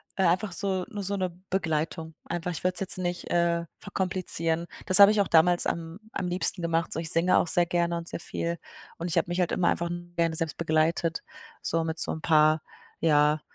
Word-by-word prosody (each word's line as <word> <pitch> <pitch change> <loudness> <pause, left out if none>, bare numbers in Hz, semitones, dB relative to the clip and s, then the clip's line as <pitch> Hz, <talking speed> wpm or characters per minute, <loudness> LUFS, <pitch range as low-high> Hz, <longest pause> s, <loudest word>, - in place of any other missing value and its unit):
äh, 190 - 0
einfach 180 +4 +1
so 190 0 -2
nur 210 -4 -5
so 200 +1 -1
'ne 185 -2 -2 0.2
Begleitung. 160 -3 -2
Einfach 175 +1 -3
ich 170 - -5
würde 185 0 0
es - - 0
jetzt 195 - -1
nicht, 175 -1 -3
äh, 170 -1 +1
verkomplizieren. 175 -4 -2 0.2
Das 185 - +5
habe 200 0 +10
ich 215 -1 +2
auch 195 - 0
damals 175 +2 +4
am 165 +2 -4
am 185 - -3
liebsten 180 +1 -1
gemacht, 165 0 0
so - - -3
ich 165 -1 -1
singe 170 +2 +3
auch - - +2
sehr 175 +1 +3
gerne 170 0 0
und 170 0 -7
sehr - - -3
viel. 170 0 -3 0.4
Und 170 - -4
ich 165 - -1
habe - - +2
mich 175 +1 -2
halt 180 - +1
immer 180 - +2
einfach 170 0 -1 0.3
gerne 165 -1 +1
selbst 160 -1 -2
begleitet, 160 0 0 0.4
so 165 0 0
mit 160 0 -3
so - - +4
'n 160 - -5
paar, 155 -1 +4 0.4
ja, 150 -1 +3
170 Hz, 215 wpm, -27 LUFS, 165-180 Hz, 0.4 s, habe